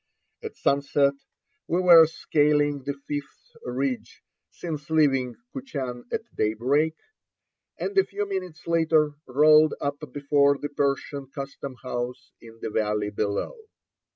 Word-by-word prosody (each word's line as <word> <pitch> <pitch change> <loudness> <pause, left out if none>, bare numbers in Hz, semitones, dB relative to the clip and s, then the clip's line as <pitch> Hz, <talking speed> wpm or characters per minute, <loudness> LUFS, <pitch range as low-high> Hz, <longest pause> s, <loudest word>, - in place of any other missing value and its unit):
At - - -7
sunset 140 0 +2 0.5
we 175 - +1
were 170 -3 +8
scaling 145 -2 +1
the 140 - -2
fifth 145 -1 -7
ridge 125 0 -3 0.3
since 155 -3 -6
leaving 135 -6 +2 0.2
Kuchan 135 - -5
at - - -2
daybreak, 130 +9 +1 0.8
and 400 - -4
a 390 - +6
few 205 - -4
minutes 185 -4 -5
later 160 -2 +3 0.2
rolled 150 +3 +5
up 140 0 -2
before 140 0 +3
the 145 - -5
Persian 140 -1 -2
custom 140 -1 -7
house 125 0 -5
in 115 -1 -14
the - - -3
valley 105 -1 0
below. 100 - -2
140 Hz, 125 wpm, -25 LUFS, 130-155 Hz, 0.8 s, were